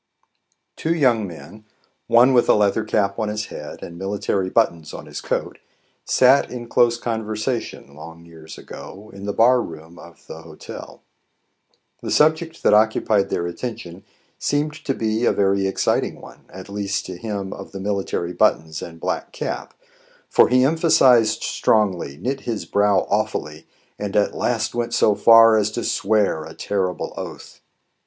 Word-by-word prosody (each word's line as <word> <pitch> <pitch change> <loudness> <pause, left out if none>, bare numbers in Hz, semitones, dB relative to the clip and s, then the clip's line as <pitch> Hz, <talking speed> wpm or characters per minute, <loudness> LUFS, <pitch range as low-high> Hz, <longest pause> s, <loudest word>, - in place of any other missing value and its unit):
TWO 165 +1 -1
young 120 -9 +2
men, 100 +5 -12 0.4
one 125 +3 +5
with 120 - +3
a - - +6
leather 105 +1 +2
cap 100 -1 0
on 110 -1 -1
his 105 0 -3
head - - -8
and 85 0 -9
military 95 -1 -2
buttons 85 -8 0
on - - -9
his - - -7
coat, - - -3 0.5
sat 130 +2 +4
in 120 -1 -7
close 120 0 +3
conversation, 110 - -4
long 80 +2 -12
years 80 -1 -12
ago, 105 +3 -11
in 100 +1 -8
the - - 0
bar 120 +4 +4
room 80 0 -10
of 85 -1 -15
the 80 - -10
Hotel. 80 -2 -11 1.0
The - - -5
subject 160 +2 +1
that - - +4
occupied 105 -1 +3
their 85 - -2
attention 95 0 -7 0.4
seemed 150 +1 -1
to 135 - -1
be 110 +1 -1
a - - +4
very 100 -1 +1
exciting 95 - -1
one, - - -15
at 95 +1 -10
least 100 -1 -3
to 95 - -7
him 100 -1 -5
of - - -10
the 95 - -7
military 95 -3 -2
buttons 80 -2 +1
and 85 -1 -9
black - - -3
cap, - - -5 0.5
for - - +5
he 125 +1 +4
emphasized 130 -8 +4
strongly, 95 -10 0
knit 130 - -3
his 115 -5 -4
brow 100 -2 +2
awfully, 75 +2 -2 0.3
and 105 -1 -4
at 105 -1 +2
last 115 -1 -1
went 120 -1 -2
so 105 - +4
far 115 +1 +7
as 105 -1 +1
to 120 +2 -4
swear 105 -6 +1
a - - -11
terrible 95 -3 -2
oath. - - -9
105 Hz, 160 wpm, -21 LUFS, 95-115 Hz, 1.0 s, far